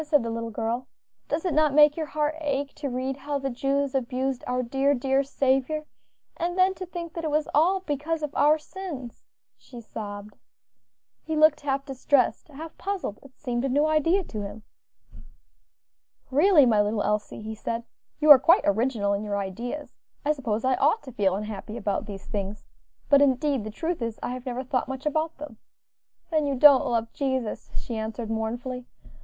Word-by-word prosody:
said 295 -4 +2
the 230 - -3
little 230 0 -3
girl, 230 +3 -3 0.4
"does 315 +4 -2
it 355 - 0
not 305 -1 +3
make 295 -1 +7
your 315 -2 -3
heart 300 0 -1
ache 280 -1 -2
to 290 -2 -4
read 260 +2 -3
how 285 +1 -3
the 275 -1 -3
Jews 275 +2 0
abused 260 0 -1
our 250 0 0
dear, 270 +3 +1
dear 270 +2 +1
Saviour? 275 +2 0 0.5
and 350 +2 -2
then 375 +1 +4
to 370 0 -7
think 340 -2 -6
that 335 - -5
it 315 - -1
was 300 0 +1
all 365 +6 +3
because 310 0 -2
of 295 -1 -3
our 300 +1 +4
sins," 305 -7 -8 0.4
she 245 - -12
sobbed. 210 -2 -8 0.8
He 320 - -3
looked 305 -1 +5
half 275 -1 -1
distressed, 270 -1 +1
half 310 +2 -9
puzzled; 380 - -3
it 275 -2 -17
seemed 245 -3 -2
a 270 - 0
new 290 +4 +3
idea 310 +5 +2
to 215 -10 -6
him. 205 +2 -7 1.7
"Really, 300 +1 +6
my 220 -4 +4
little 205 0 0
Elsie," 210 0 -2
he 220 +1 -5
said, 230 +2 -4 0.4
"you 305 0 +7
are 280 - +12
quite 335 +8 +5
original 205 -1 +1
in 200 +1 -2
your 205 -1 -2
ideas, 235 +9 -5 0.3
I 300 - +3
suppose 245 -6 -2
I 260 -1 +2
ought 315 +11 +2
to 260 - -9
feel 200 -5 +1
unhappy 210 +1 -6
about 205 -2 -2
these 195 -2 -8
things, 200 0 -5 0.4
but 280 -1 +6
indeed 275 -2 +2
the 215 - -5
truth 325 +7 -3
is, 230 -1 -3
I - - -2
have 255 +1 -7
never 250 +1 -3
thought 255 -1 -1
much 265 +1 -6
about 315 +2 -1
them." 290 -6 -9 0.7
"Then 310 -2 +2
you 280 - 0
don't 280 0 +7
love 230 -2 -1
Jesus," 260 -6 -2
she 235 - -4
answered, 220 +1 -4
mournfully. 240 +3 -3
270 Hz, 185 wpm, -26 LUFS, 230-300 Hz, 1.7 s, are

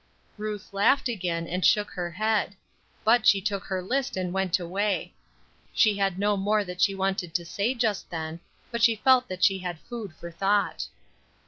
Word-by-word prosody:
Ruth 210 -2 -6
laughed 230 +8 +3
again, 175 -7 -2
and 180 +2 -2
shook 210 0 +3
her 175 -2 -3
head. 210 +2 0 0.5
But 235 +3 +4
she 200 - +6
took 200 0 -3
her 185 -1 -3
list 260 +3 -1
and 180 -1 -2
went 190 -1 +1
away. 195 +3 -1 0.6
She 215 -3 +4
had 195 -2 0
no 205 +1 +2
more 205 +2 +1
that 180 -1 -7
she 195 - +3
wanted 190 -3 -2
to 170 -1 0
say 205 +9 -1
just 225 -5 -1
then; 160 -1 -5 0.3
but 235 -1 -3
she 230 0 +5
felt 255 +2 +4
that 185 0 -5
she 195 -1 +4
had 180 -2 -4
food 215 -7 -7
for 170 +1 -9
thought. 200 +4 0
195 Hz, 185 wpm, -27 LUFS, 180-215 Hz, 0.6 s, she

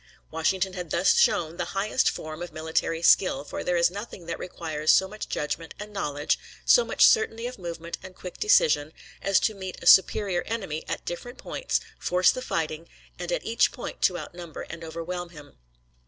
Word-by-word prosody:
Washington 185 +4 0
had 180 -3 -6
thus 175 +4 +3
shown 165 0 +2
the - - -1
highest 215 +6 +2
form 155 +1 -6
of 175 - -6
military 160 +1 -2
skill, 175 -5 +4
for - - -6
there 180 -1 +1
is 170 0 +3
nothing 200 -2 -8
that 170 - -4
requires 155 -3 -4
so 190 - +6
much 215 +2 -7
judgment 160 +2 -3
and 210 0 -8
knowledge, 145 -7 -1 0.3
so 485 - +6
much - - +4
certainty 240 - +3
of 250 -3 -6
movement 170 -1 -6
and 185 -1 -11
quick 180 - -9
decision, 155 -6 +3 0.3
as 195 -1 +3
to 220 - +1
meet 190 -2 -7
a - - -9
superior 190 -1 +5
enemy 195 -9 -3
at - - -4
different 245 +9 -6
points, - - -2 0.2
force 180 +1 +3
the 255 - -5
fighting, 160 -6 -3 0.3
and - - -4
at - - -2
each 230 +1 +3
point 245 - -7
to 180 - +3
outnumber 175 -3 -8
and 170 - -8
overwhelm 170 +2 -5
him. 150 - -14
175 Hz, 185 wpm, -26 LUFS, 160-195 Hz, 0.3 s, so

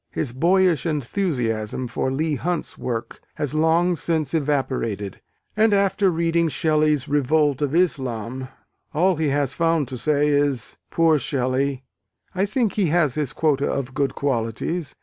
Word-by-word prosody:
His 130 -6 -3
boyish 175 +2 +2
enthusiasm 130 - -2
for 120 +3 -2
Leigh 155 +3 -1
Hunt's 175 +5 -2
work 115 -2 -5
has 145 -1 -2
long 165 +3 +3
since 160 -4 0
evaporated: 130 - -1 0.3
and 215 -1 +4
after 200 0 +2
reading 170 -1 +1
Shelley's 150 -1 +1
Revolt 145 0 +2
of 145 +1 0
Islam, 130 - -1 0.5
all 180 +2 +3
he 160 -1 0
has 140 -1 0
found 165 -3 +1
to 130 -2 -6
say 150 +1 +2
is, 145 -5 0
"Poor 165 -2 +3
Shelley, 135 0 -1 0.5
I 190 +2 0
think 220 0 0
he 200 -4 +1
has 155 -4 +2
his 150 -3 -2
quota 145 -3 +1
of 135 -1 -3
good 140 +1 -1
qualities!" 140 +5 -2
150 Hz, 145 wpm, -23 LUFS, 130-165 Hz, 0.5 s, and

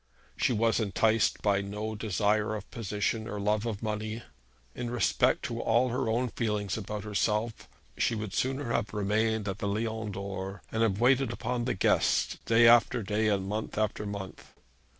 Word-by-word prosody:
She 130 - +1
was 115 0 +2
enticed 110 +1 +1
by 100 -1 +3
no 105 +2 -4
desire 105 +1 0
of 105 - -8
position, 110 0 -2
or 105 -3 -4
love 105 +2 0
of 110 -1 -4
money. 110 +1 -3 0.5
In 120 - -4
respect 120 0 +2
to 115 0 -3
all 120 +3 +3
her 120 -1 -1
own 120 +3 +1
feelings 105 -4 -2
about 105 -1 -5
herself 105 +2 -1 0.3
she 115 - +1
would 105 -3 -5
sooner 130 -1 -1
have 105 - -1
remained 105 +1 0
at 95 0 -3
the 100 - -2
Lion 110 +1 -2
d'Or, 95 0 -5
and 110 - -1
have 105 -3 +2
waited 130 0 +3
upon 120 0 -2
the 125 - 0
guests - - +2
day 115 +1 +6
after 120 0 +5
day, 105 +2 0
and 100 -2 +1
month 105 +2 -4
after 105 -1 -1
month. 100 -2 -8
110 Hz, 170 wpm, -29 LUFS, 105-115 Hz, 0.5 s, day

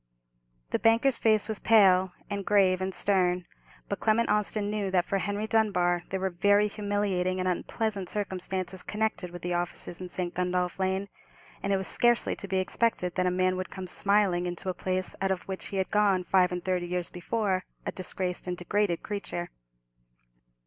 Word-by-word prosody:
The - - +1
banker's 230 +3 +3
face 215 -2 +3
was 220 -2 -2
pale, 190 -4 +5
and 200 -1 -3
grave, 190 -2 +3
and 190 +1 -1
stern; 180 -2 +1 0.4
but 200 - -3
Clement 230 +1 +2
Austin 210 0 0
knew 210 -2 -1
that 180 -2 +2
for 195 - 0
Henry 205 +2 -2
Dunbar 185 -6 +2
there 190 - -2
were 190 0 -1
very 205 +4 +3
humiliating 200 -3 -1
and 185 - 0
unpleasant 200 +1 -2
circumstances 190 -2 -3
connected 210 -3 -2
with 175 0 -10
the 175 0 -1
offices 175 0 -4
in 180 - -6
St. 175 -1 -3
Gundolph 180 0 -1
Lane, 190 +1 0 0.5
and 200 - -1
it 195 - +3
was 190 - -2
scarcely 240 +3 +2
to 200 - -5
be 190 0 0
expected 185 -1 0
that 185 -1 +1
a - - +4
man 185 0 +1
would 185 - -4
come 190 -1 -6
smiling 195 -2 +2
into 175 +1 -4
a - - 0
place 185 +1 -1
out 195 - +1
of 190 -2 -1
which 190 -1 -5
he 195 - -4
had 190 - -1
gone 200 -3 +3
five 180 0 +3
and 180 -1 -4
thirty 180 -2 0
years 180 0 -3
before 185 0 -1 0.2
a - - -1
disgraced 185 -1 -3
and 180 0 -2
degraded 180 0 0
creature. 200 -4 -4
190 Hz, 185 wpm, -28 LUFS, 180-205 Hz, 0.5 s, pale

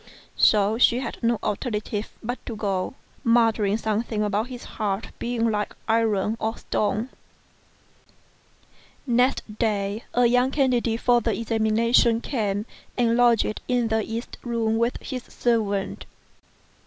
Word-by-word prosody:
So 210 +1 +4
she 240 - +5
had 250 -2 -5
no 235 0 +2
alternative 210 0 -2
but 245 +3 -4
to 230 - -4
go, 200 0 -2 0.3
muttering 225 -3 +3
something 220 0 -1
about 210 +2 0
his 250 -1 -8
heart 205 -1 -3
being 230 -1 0
like 210 -1 -2
iron 220 -2 +1
or 220 +1 -2
stone. 215 +4 -1 2.0
Next 245 -3 +1
day, 210 -1 0
a 245 0 +4
young 250 +2 +3
candidate 250 -5 +1
for 240 -1 +4
the - - -1
examination 230 +1 +3
came 210 -5 -2 0.3
and 235 -2 +3
lodged 235 -3 +3
in 245 -2 +1
the 220 0 +1
east 230 +3 -6
room 225 -2 0
with 235 +1 +1
his 255 -2 -4
servant. 210 -5 -1
225 Hz, 130 wpm, -24 LUFS, 210-240 Hz, 2.0 s, she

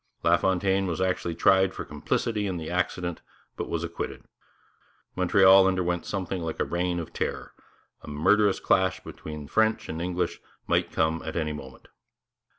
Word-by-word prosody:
LaFontaine 95 +1 +2
was 85 0 -2
actually 90 -2 -1
tried 95 +1 +4
for - - -5
complicity 105 -3 -1
in 95 -2 -2
the 80 0 -5
accident, 90 -1 -2 0.3
but - - -5
was 85 0 -2
acquitted. 85 0 -5 0.9
Montreal 95 +1 +6
underwent 90 -2 0
something 95 -2 -3
like 80 -1 -4
a - - +1
Reign 90 0 -1
of 85 - -6
Terror; - - -3 0.5
a - - -13
murderous 100 +7 +3
clash 95 -1 +2
between 75 -2 -8
French 110 +4 +1
and 80 +1 -4
English 90 0 -2 0.2
might - - +1
come 80 0 0
at - - -5
any 75 -2 -1
moment. 75 - -10
90 Hz, 155 wpm, -27 LUFS, 85-95 Hz, 0.9 s, Montreal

